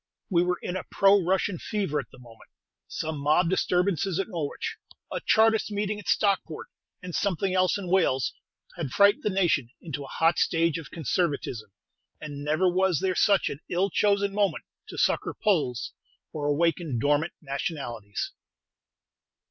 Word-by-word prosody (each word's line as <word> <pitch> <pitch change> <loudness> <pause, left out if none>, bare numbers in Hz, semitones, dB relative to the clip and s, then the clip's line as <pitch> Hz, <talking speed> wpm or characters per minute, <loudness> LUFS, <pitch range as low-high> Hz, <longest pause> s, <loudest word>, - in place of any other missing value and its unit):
We 170 -2 +4
were 180 0 0
in 180 - -3
a 185 - -3
pro 195 0 +5
Russian 190 0 0
fever 195 -9 -2
at 130 - -7
the - - -15
moment. 120 -3 -16 0.4
Some 155 -2 -4
mob 155 +5 +2
disturbances 180 -1 +1
at 195 - -2
Norwich, 165 -7 -4 0.4
a - - -3
Chartist 220 0 +3
meeting 205 0 -2
at 205 - -12
Stockport, 195 -6 0 0.3
and 180 -1 -7
something 195 0 0
else 185 +1 +2
in 195 -3 -6
Wales, 170 -9 +2 0.4
had 160 -6 -3
frightened 200 +8 +4
the - - 0
nation 175 - +1
into 150 -3 -6
a - - -9
hot 165 +4 +2
stage 165 -1 +2
of 150 - -10
conservatism; 140 - -2 0.5
and 145 -2 -7
never 155 +5 +2
was 185 -1 +2
there 190 -1 0
such 200 +2 +3
an 140 - -4
ill 185 +2 +1
chosen 200 +1 +2
moment 205 -1 0 0.2
to - - -9
succor - - +1
Poles 150 - 0 0.4
or 145 -2 -2
awaken 160 -2 +1
dormant 145 +6 +1
nationalities. 135 - -4
175 Hz, 155 wpm, -27 LUFS, 145-195 Hz, 0.5 s, pro